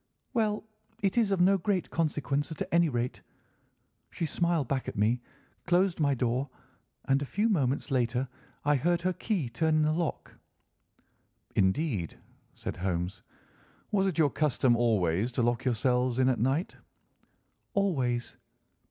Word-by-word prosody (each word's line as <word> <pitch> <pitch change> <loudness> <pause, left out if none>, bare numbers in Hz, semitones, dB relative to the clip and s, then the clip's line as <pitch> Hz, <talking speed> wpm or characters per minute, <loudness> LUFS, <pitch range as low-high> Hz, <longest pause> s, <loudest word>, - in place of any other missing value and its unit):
"'Well, 215 -3 +1 0.4
it 195 - +2
is 230 -4 +3
of 195 -2 +1
no 195 +2 +5
great 190 0 -1
consequence, 150 -2 -1
at 160 - -4
any 170 -1 +4
rate.' 120 -1 -2 0.9
She 165 - -3
smiled 170 -3 0
back 135 -1 -2
at - - -5
me, 115 +4 +2 0.5
closed 180 0 +2
my 140 -3 +2
door, 125 +2 -1 0.6
and 135 +1 +2
a - - -1
few 205 +10 0
moments 140 - 0
later 125 0 +1 0.4
I 145 0 +4
heard 170 +4 +1
her 185 0 +1
key 185 - -1
turn 155 +7 +1
in 155 - +3
the 155 0 +2
lock." 165 0 -3 1.2
"Indeed," 95 - 0 0.4
said - - -5
Holmes. 90 0 -2 0.7
"Was 195 -2 +2
it 185 - -2
your 150 -4 +4
custom 135 -5 +2
always 110 -2 +1
to 120 - +1
lock 120 0 0
yourselves 125 0 +1
in 130 0 +4
at 130 - +1
night?" 135 - 0 1.0
"Always." 130 - 0
140 Hz, 145 wpm, -29 LUFS, 120-170 Hz, 1.2 s, no